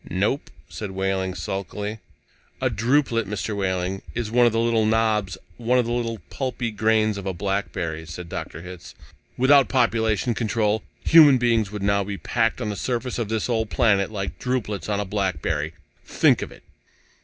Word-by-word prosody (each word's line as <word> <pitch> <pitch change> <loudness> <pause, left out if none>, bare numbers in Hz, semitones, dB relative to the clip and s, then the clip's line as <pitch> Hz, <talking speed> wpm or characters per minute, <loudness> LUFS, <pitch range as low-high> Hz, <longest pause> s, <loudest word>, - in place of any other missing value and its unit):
"Nope," 105 - -1 0.2
said 105 +7 -6
Wehling 95 -1 -1
sulkily. 100 +4 -4 0.6
"A 130 -1 0
drupelet, 115 0 +1
Mr. 105 +1 -3
Wehling, 95 -1 -1
is 115 -2 -3
one 120 0 +5
of - - +2
the 115 - 0
little 115 -2 +2
knobs, 110 -4 +1 0.2
one 120 +2 +1
of 125 - +3
the 120 - -3
little 115 -1 -1
pulpy 125 -3 -3
grains 110 -1 +2
of 100 - -6
a 95 - -1
blackberry," 85 -4 -3
said 85 +2 -7
Dr. 85 0 -6
Hitz. 90 -1 -10 0.4
"Without 130 -2 +5
population 115 -1 +1
control, 110 -2 0 0.2
human 150 -5 +8
beings 115 -4 +1
would 105 -2 -5
now 100 0 +2
be 100 0 -5
packed 115 +2 0
on 115 -4 -2
this 100 - -5
surface 125 0 -2
of 115 -3 -2
this 110 -1 -1
old 110 -3 0
planet 100 -4 +2
like 100 -2 -5
drupelets 115 -6 -2
on 100 -1 0
a 105 - -1
blackberry! 80 -6 -2 0.3
Think - - +3
of - - -5
it!" - - -15
105 Hz, 175 wpm, -24 LUFS, 95-115 Hz, 0.6 s, human